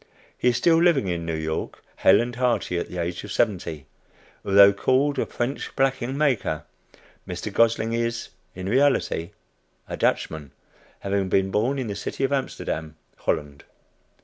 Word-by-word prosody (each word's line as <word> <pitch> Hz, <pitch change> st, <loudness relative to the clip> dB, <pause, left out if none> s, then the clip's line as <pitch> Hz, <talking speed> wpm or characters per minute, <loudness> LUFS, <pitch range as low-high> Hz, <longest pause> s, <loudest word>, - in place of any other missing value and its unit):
He -, -, -1 dB
is 120 Hz, -2 st, +3 dB
still 165 Hz, +5 st, +4 dB
living 170 Hz, -, +3 dB
in 85 Hz, -1 st, -3 dB
New 80 Hz, -, -1 dB
York, 80 Hz, 0 st, -4 dB
hale 95 Hz, +3 st, +5 dB
and 120 Hz, 0 st, -4 dB
hearty 120 Hz, -8 st, 0 dB
at -, -, -5 dB
the 90 Hz, -, -7 dB
age 85 Hz, 0 st, -3 dB
of 105 Hz, -, -8 dB
seventy. 90 Hz, -, -1 dB, 0.6 s
Although 100 Hz, 0 st, +7 dB
called 135 Hz, +7 st, +1 dB
a -, -, 0 dB
"French" 125 Hz, +4 st, -4 dB
blacking 135 Hz, -1 st, 0 dB
maker, 130 Hz, -, 0 dB, 0.6 s
Mr. -, -, -5 dB
Gosling 115 Hz, 0 st, +2 dB
is 115 Hz, 0 st, -2 dB, 0.3 s
in 95 Hz, 0 st, -6 dB
reality 130 Hz, -8 st, +2 dB, 0.6 s
a -, -, -4 dB
Dutchman, 75 Hz, -3 st, -1 dB, 0.5 s
having 100 Hz, -1 st, -1 dB
been 95 Hz, +1 st, +2 dB
born 120 Hz, +8 st, +1 dB
in 130 Hz, -, -2 dB
the 105 Hz, -2 st, -4 dB
city 100 Hz, +6 st, -4 dB
of 135 Hz, -, +1 dB
Amsterdam, 80 Hz, -, -3 dB, 0.2 s
Holland. 70 Hz, -1 st, -3 dB
105 Hz, 155 wpm, -24 LUFS, 90-130 Hz, 0.6 s, Although